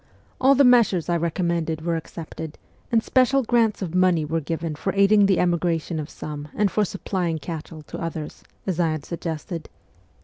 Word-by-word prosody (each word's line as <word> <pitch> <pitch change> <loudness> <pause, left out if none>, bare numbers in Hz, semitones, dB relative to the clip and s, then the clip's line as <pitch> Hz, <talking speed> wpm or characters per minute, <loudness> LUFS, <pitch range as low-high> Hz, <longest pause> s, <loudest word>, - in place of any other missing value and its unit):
All 270 +1 +6
the 280 - +5
measures 230 - +4
I 175 - +2
recommended 170 -1 -1
were 170 -1 +1
accepted, 160 -1 -7 0.3
and 225 -2 +3
special 265 +1 +3
grants 225 -3 +2
of 170 -3 -5
money 180 -4 +3
were 160 +2 -1
given 160 +1 -3
for 170 +6 -2
aiding 200 +1 +5
the 190 -2 +3
emigration 170 -2 0
of 150 0 -5
some 150 -1 -7
and 205 -2 +2
for 210 - +2
supplying 185 -4 -2
cattle 160 -1 -7
to - - -8
others, 160 -2 -5 0.2
as 185 -3 -2
I 165 -2 +2
had 155 -2 -5
suggested. 165 -1 -5
170 Hz, 175 wpm, -24 LUFS, 160-200 Hz, 0.3 s, All